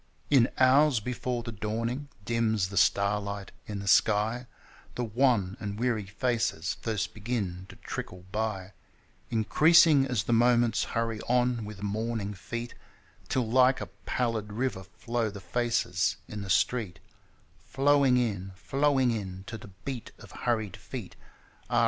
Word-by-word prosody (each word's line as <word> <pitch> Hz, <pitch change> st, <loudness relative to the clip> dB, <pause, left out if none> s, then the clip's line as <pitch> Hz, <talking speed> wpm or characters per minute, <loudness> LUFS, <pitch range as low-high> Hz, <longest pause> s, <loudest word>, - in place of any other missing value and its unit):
In 130 Hz, -4 st, +5 dB
hours 135 Hz, 0 st, +5 dB
before 125 Hz, +1 st, -3 dB
the 115 Hz, -, -5 dB
dawning 115 Hz, +6 st, -3 dB, 0.2 s
dims 110 Hz, -4 st, +1 dB
the 100 Hz, -, -8 dB
starlight 100 Hz, +1 st, +1 dB, 0.2 s
in 105 Hz, -, -4 dB
the 100 Hz, 0 st, -6 dB
sky 110 Hz, +5 st, +3 dB, 0.5 s
The 125 Hz, -, -2 dB
wan 115 Hz, -5 st, +2 dB
and 100 Hz, -1 st, -5 dB
weary 115 Hz, -4 st, 0 dB
faces 105 Hz, -3 st, -1 dB
first 110 Hz, -5 st, -2 dB
begin 100 Hz, -5 st, -3 dB
to -, -, -11 dB
trickle 90 Hz, 0 st, -7 dB
by, 100 Hz, -3 st, -3 dB, 0.6 s
Increasing 150 Hz, +5 st, +5 dB
as 125 Hz, -5 st, 0 dB
the 120 Hz, -, 0 dB
moments 120 Hz, -1 st, +3 dB
hurry 115 Hz, -1 st, -1 dB
on 125 Hz, -2 st, +2 dB
with 105 Hz, -1 st, -8 dB
morning 105 Hz, 0 st, -2 dB
feet, 120 Hz, +6 st, -6 dB, 0.6 s
Till 125 Hz, -3 st, 0 dB
like 130 Hz, +3 st, +4 dB
a -, -, -6 dB, 0.2 s
pallid 115 Hz, -4 st, -1 dB
river 120 Hz, -4 st, -1 dB
flow 115 Hz, +4 st, -2 dB
the 100 Hz, 0 st, -8 dB
faces 100 Hz, -2 st, 0 dB
in 105 Hz, -1 st, -6 dB
the 100 Hz, -, -7 dB
street 105 Hz, -1 st, +1 dB, 0.6 s
Flowing 135 Hz, -2 st, +3 dB
in, 100 Hz, -6 st, -1 dB
flowing 135 Hz, +4 st, +2 dB
in, 95 Hz, -4 st, -4 dB
To 110 Hz, -, -6 dB
the 105 Hz, -2 st, -10 dB, 0.2 s
beat 130 Hz, -4 st, -5 dB
of -, -, -14 dB
hurried 110 Hz, -5 st, -2 dB
feet -, -, -8 dB, 0.5 s
Ah! 120 Hz, -, +3 dB
115 Hz, 145 wpm, -29 LUFS, 100-125 Hz, 0.6 s, In